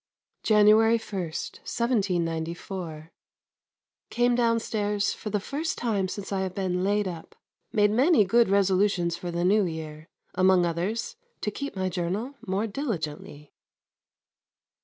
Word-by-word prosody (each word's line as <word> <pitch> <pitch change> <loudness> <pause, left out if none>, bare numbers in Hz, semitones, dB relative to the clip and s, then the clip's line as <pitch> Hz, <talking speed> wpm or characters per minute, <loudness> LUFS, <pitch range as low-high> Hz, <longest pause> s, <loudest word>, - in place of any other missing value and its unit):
January 215 +1 +5
1, 205 -3 -6
1794. 170 -4 -3 1.0
Came 245 0 +2
downstairs 220 -4 0
for 215 - -6
the 210 0 0
first 295 +10 -3
time 210 -6 0
since 195 +2 -6
I 195 - 0
have 185 -1 -3
been 185 -2 -1
laid 205 +1 +1
up. 170 -3 -8 0.4
Made 210 -2 +3
many 255 - +4
good 230 +3 +3
resolutions 195 -3 +2
for 175 +1 -6
the 170 +1 -1
New 205 +3 +4
Year. 155 -1 -7 0.2
Among 185 -1 +4
others 185 - -2 0.2
to 210 - -1
keep 280 +4 -5
my 190 -1 -1
journal 185 +8 -3
more 195 +3 -1
diligently. 160 - -5
195 Hz, 125 wpm, -26 LUFS, 175-220 Hz, 1.0 s, January